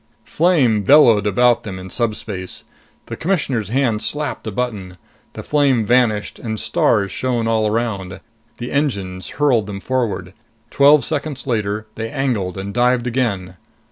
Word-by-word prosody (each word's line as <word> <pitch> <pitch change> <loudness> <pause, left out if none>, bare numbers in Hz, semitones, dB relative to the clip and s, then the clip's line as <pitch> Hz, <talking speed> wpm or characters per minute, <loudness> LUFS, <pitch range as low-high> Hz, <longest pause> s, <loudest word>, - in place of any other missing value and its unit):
Flame 145 - +2
bellowed 110 -3 +5
about 120 +3 +3
them 100 -5 -7
in 95 0 -9
subspace. 105 -5 -3 0.4
The - - -6
Commissioner's 140 - -1
hand 120 -3 +1
slapped 150 -6 -3
a - - -2
button. 100 -5 -4 0.4
The - - -8
flame 140 -6 +2
vanished 115 -3 +1
and 110 -2 -4
stars 100 -4 +1
shone 120 -1 -1
all 110 -1 +1
around. 100 -4 -2 0.4
The 120 +1 -6
engines 100 -11 -2
hurled 130 -8 +2
them 100 -1 -6
forward. 105 -7 -2 0.4
Twelve 140 +1 +5
seconds 145 -3 -3
later, 110 -3 -2
they 115 +1 -5
angled 115 -9 -2
and 100 +1 -5
dived 125 0 +2
again. 105 -8 -2
115 Hz, 140 wpm, -19 LUFS, 100-130 Hz, 0.4 s, bellowed